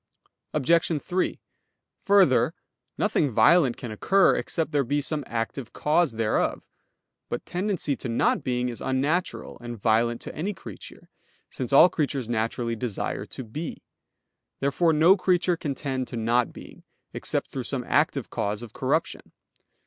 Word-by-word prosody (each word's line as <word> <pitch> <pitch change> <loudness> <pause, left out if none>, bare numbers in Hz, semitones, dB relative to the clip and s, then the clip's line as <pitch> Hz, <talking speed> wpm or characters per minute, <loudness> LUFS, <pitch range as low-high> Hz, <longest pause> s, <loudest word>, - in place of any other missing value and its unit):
Obj. 165 +2 +2
3: 180 +4 -2 0.7
Further, 195 -10 +4 0.4
nothing 145 - +1
violent 125 +4 +4
can 120 -4 -6
occur, 195 - +3
except 160 -2 -2
there 145 -2 +2
be 145 +4 0
some 150 +1 -1
active 115 +2 -4
cause 155 -2 +2
thereof. 110 -1 0 0.7
But - - -4
tendency 180 -6 -1
to 125 - -5
not 115 - +1
being 125 -1 -1
is 120 - -7
unnatural 145 +7 -1
and 120 -1 -7
violent 115 +2 +2
to - - -7
any 190 +6 -3
creature, - - -11 0.4
since 125 -3 -4
all 140 +5 +8
creatures 140 -7 -2
naturally 115 0 -1
desire 115 -2 -3
to - - -7
be. 145 +8 -6 0.8
Therefore 140 +5 +2
no 160 +5 +6
creature 180 -2 +2
can 145 -4 -4
tend 130 -3 -3
to 120 - -6
not 115 +2 +1
being, - - -12 0.3
except - - -2
through - - -3
some - - -2
active - - +1
cause 105 +3 -2
of 115 - -10
corruption. - - -2
135 Hz, 145 wpm, -26 LUFS, 120-165 Hz, 0.8 s, all